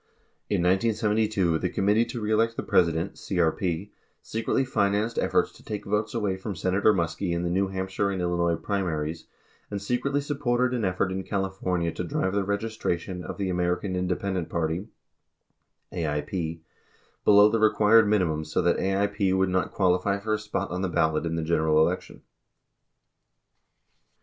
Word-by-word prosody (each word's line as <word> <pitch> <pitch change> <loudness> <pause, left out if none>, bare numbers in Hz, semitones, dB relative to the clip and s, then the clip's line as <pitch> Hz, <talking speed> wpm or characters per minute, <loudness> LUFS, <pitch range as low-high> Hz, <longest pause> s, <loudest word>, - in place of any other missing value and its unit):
In 85 - +1
1972, 105 -2 +1
the 90 - -1
Committee 105 +6 +2
To 120 +1 -6
Re 105 0 -2
Elect 115 +1 +2
the - - -2
President 85 +1 +2
(CRP) 90 +1 -1 0.3
secretly 115 +4 -1
financed 105 -1 0
efforts - - +1
to - - -18
take 105 -1 -5
votes 105 +2 -1
away 100 -4 0
from 95 +1 -5
Senator 95 +5 +2
Muskie 85 0 -1
in 85 0 -1
the 85 - -1
New 95 +2 +1
Hampshire 95 +1 -2
and 95 -1 -2
Illinois 85 -1 +1
primaries, 80 -4 -3 0.4
and 100 - -3
secretly 125 +7 -1
supported 125 -3 0
an 120 - -2
effort 95 +1 0
in 95 +1 -2
California 95 -4 -1
to 90 - -4
drive 95 +2 -1
the 100 -1 +1
registration 100 -3 -3
of - - -6
the 95 -2 -1
American 90 +2 -1
Independent 90 -1 -2
Party 85 +4 -2 1.1
(AIP) 80 +1 -3 0.6
below 105 0 +7
the 115 - +1
required 110 0 +5
minimum 90 -7 +1
so 80 0 -2
that 85 - +2
AIP 100 0 +1
would 95 0 +2
not 90 0 0
qualify 95 +1 +1
for 110 +2 -2
a 105 - 0
spot 105 -3 -3
on 90 +1 -2
the 95 - -1
ballot 80 -1 +1
in 80 - -2
the 80 - -2
general 80 -1 +2
election. 90 +4 -1
95 Hz, 160 wpm, -26 LUFS, 85-105 Hz, 1.1 s, below